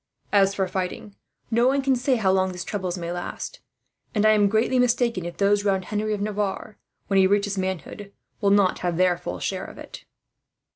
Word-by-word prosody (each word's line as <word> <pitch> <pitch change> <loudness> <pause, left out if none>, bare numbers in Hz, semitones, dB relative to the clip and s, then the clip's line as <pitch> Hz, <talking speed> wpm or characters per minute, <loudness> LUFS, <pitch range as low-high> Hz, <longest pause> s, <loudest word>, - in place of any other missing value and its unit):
"As 195 -1 +4
for 190 -2 0
fighting, 190 +2 -4 0.4
no 235 +2 +3
one 275 +1 +2
can 270 -1 +3
say 255 +1 +1
how 200 -5 +2
long 190 0 +2
these 180 0 -6
troubles 185 -3 -3
may 170 -1 -4
last; 175 - -6 0.6
and 210 0 +2
I 215 - +7
am 205 -2 +4
greatly 225 +4 +2
mistaken 240 -6 +1
if 175 - -6
those 205 0 +2
round 190 -2 0
Henry 215 0 -1
of 205 - -6
Navarre, 205 0 -3 0.3
when 195 -1 +2
he 190 - +5
reaches 205 0 +1
manhood, 190 +2 -4 0.3
will 200 - +2
not 200 -2 +3
have 175 -2 -2
their 180 -1 +3
full 90 - -6
share - - -3
of - - -11
it." - - -11
200 Hz, 200 wpm, -24 LUFS, 185-215 Hz, 0.6 s, I